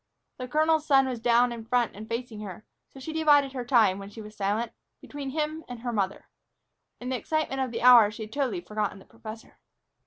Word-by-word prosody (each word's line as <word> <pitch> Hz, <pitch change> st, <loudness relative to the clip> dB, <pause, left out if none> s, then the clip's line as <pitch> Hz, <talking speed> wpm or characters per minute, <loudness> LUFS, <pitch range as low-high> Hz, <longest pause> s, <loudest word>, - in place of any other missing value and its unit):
The 255 Hz, -, -5 dB
colonel's 310 Hz, +2 st, +2 dB
son 270 Hz, -2 st, +5 dB
was 250 Hz, -3 st, -3 dB
down 240 Hz, +1 st, +3 dB
in 235 Hz, -1 st, -6 dB
front 240 Hz, 0 st, 0 dB
and 215 Hz, +2 st, -9 dB
facing 230 Hz, -2 st, -4 dB
her, 205 Hz, 0 st, -8 dB, 0.2 s
so 270 Hz, -, -13 dB
she 315 Hz, +4 st, -6 dB
divided 290 Hz, -4 st, +4 dB
her 255 Hz, -2 st, -4 dB
time, 225 Hz, -6 st, +3 dB
when 195 Hz, 0 st, -8 dB
she 215 Hz, -, -12 dB
was 215 Hz, 0 st, -10 dB
silent, 210 Hz, +3 st, -1 dB, 0.3 s
between 285 Hz, -2 st, -7 dB
him 310 Hz, +2 st, -3 dB
and 245 Hz, -2 st, -8 dB
her 240 Hz, -1 st, -3 dB
mother. 195 Hz, -2 st, -2 dB, 0.7 s
In 250 Hz, -, -6 dB
the 260 Hz, -, -1 dB
excitement 300 Hz, 0 st, -2 dB
of 260 Hz, -, -1 dB
the 230 Hz, 0 st, -5 dB
hour 240 Hz, -4 st, +8 dB
she 215 Hz, +1 st, -7 dB
had 215 Hz, -, -10 dB
totally 255 Hz, -11 st, -1 dB
forgotten 210 Hz, +2 st, -3 dB
the 190 Hz, -, -15 dB
professor. 225 Hz, 0 st, -11 dB
240 Hz, 215 wpm, -27 LUFS, 215-270 Hz, 0.7 s, hour